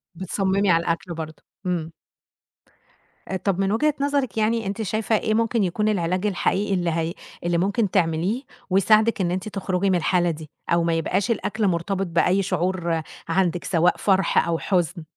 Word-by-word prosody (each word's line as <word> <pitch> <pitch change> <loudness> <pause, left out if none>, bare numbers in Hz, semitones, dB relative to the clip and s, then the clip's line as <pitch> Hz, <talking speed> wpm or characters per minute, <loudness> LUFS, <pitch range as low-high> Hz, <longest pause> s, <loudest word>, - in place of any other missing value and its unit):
بتصممي 190 +2 0
على 165 -1 +4
الأكل 170 +1 -2
برضه. 160 -1 -7 0.2
إمم. 170 -3 -2 1.4
آآ، - - -3
طَب 195 0 -1
من 195 0 +1
وجهة 300 +8 +2
نظرِك 280 -7 0
يعني 220 +1 +1
أنتِ 200 +3 -3
شايفة 220 +1 0
إيه 215 - -1
ممكن 225 0 +1
يكون 210 +4 0
العلاج 185 -1 0
الحقيقي 200 0 0
اللي 175 -2 0
هي 165 +1 -1 0.3
اللي 175 0 +1
ممكن 200 +3 +1
تعمليه 180 +6 +1 0.3
ويساعدِك 215 +3 +4
إن 175 -2 0
أنتِ 185 +3 -3
تخرجي 195 -1 -1
من 185 - +3
الحالة 175 0 +2
دي، 155 -2 -9 0.2
أو 170 0 +3
ما 165 0 +1
يبقاش 185 +7 0
الأكل 210 0 -1
مرتبط 190 +2 -1
بأي 175 +3 +2
شعور 175 -3 -1 0.3
عندِك 175 0 +1
سواء 175 0 +2
فرح 190 -3 +2
أو 170 -1 +1
حزن؟ 175 -3 0
185 Hz, 165 wpm, -23 LUFS, 170-205 Hz, 1.4 s, على